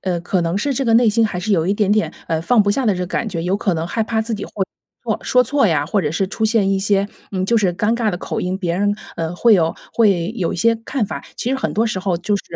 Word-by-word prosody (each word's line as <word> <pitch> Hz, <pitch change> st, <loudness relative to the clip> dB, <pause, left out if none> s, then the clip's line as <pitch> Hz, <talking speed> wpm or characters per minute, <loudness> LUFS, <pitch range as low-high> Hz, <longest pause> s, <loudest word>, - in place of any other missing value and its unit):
呃， 180 Hz, -2 st, -1 dB
可 180 Hz, +2 st, 0 dB
能 170 Hz, +1 st, -1 dB
是 275 Hz, +8 st, 0 dB
这 270 Hz, -, -1 dB
个 230 Hz, -2 st, +3 dB
内 235 Hz, 0 st, +5 dB
心 225 Hz, +1 st, +3 dB
还 190 Hz, -4 st, -4 dB
是 210 Hz, +4 st, -1 dB
有 165 Hz, -4 st, +2 dB
一 195 Hz, -, +1 dB
点 205 Hz, -1 st, +2 dB
点， 215 Hz, 0 st, +1 dB, 0.2 s
呃， 160 Hz, -1 st, -1 dB
放 210 Hz, +6 st, +3 dB
不 205 Hz, -, +1 dB
下 265 Hz, +6 st, 0 dB
的 210 Hz, -, +4 dB
这 180 Hz, -, -4 dB
个 180 Hz, -, -2 dB
感 220 Hz, -, -2 dB
觉， 170 Hz, -5 st, -4 dB
有 180 Hz, +3 st, 0 dB
可 195 Hz, -3 st, 0 dB
能 165 Hz, +1 st, -2 dB
害 225 Hz, +5 st, -1 dB
怕 220 Hz, 0 st, -1 dB
自 225 Hz, 0 st, -3 dB
己 205 Hz, -, -5 dB
会 -, -, -15 dB, 0.5 s
错 -, -, -1 dB
说 250 Hz, -, +3 dB
错 275 Hz, +1 st, +2 dB
呀， 155 Hz, -6 st, +1 dB
或 195 Hz, +6 st, 0 dB
者 150 Hz, -, -1 dB
是 175 Hz, +5 st, 0 dB
出 210 Hz, +3 st, -6 dB
现 220 Hz, -3 st, +2 dB
一 195 Hz, -, +1 dB
些， 200 Hz, 0 st, +1 dB, 0.3 s
嗯， 185 Hz, -1 st, -1 dB
就 230 Hz, +4 st, +3 dB
是 190 Hz, -4 st, +1 dB
尴 210 Hz, +4 st, +1 dB
尬 230 Hz, -2 st, 0 dB
的 175 Hz, -, -3 dB
口 -, -, -4 dB
音， 180 Hz, +1 st, -2 dB
别 175 Hz, -3 st, -2 dB
人， 205 Hz, +1 st, +2 dB, 0.2 s
呃， 165 Hz, +1 st, -3 dB
会 235 Hz, +3 st, +5 dB
有 165 Hz, -5 st, +3 dB, 0.2 s
会 200 Hz, -4 st, +2 dB
有 175 Hz, -4 st, -1 dB
一 -, -, -5 dB
些 230 Hz, +6 st, +3 dB
看 265 Hz, -6 st, 0 dB
法。 -, -, -6 dB
其 245 Hz, -, -2 dB
实 -, -, +1 dB
很 265 Hz, -, -2 dB
多 225 Hz, +2 st, +2 dB
时 195 Hz, -4 st, -2 dB
候 185 Hz, -2 st, 0 dB
就 185 Hz, +5 st, -1 dB
是， 200 Hz, -, -2 dB
200 Hz, 330 characters per minute, -19 LUFS, 180-225 Hz, 0.5 s, 内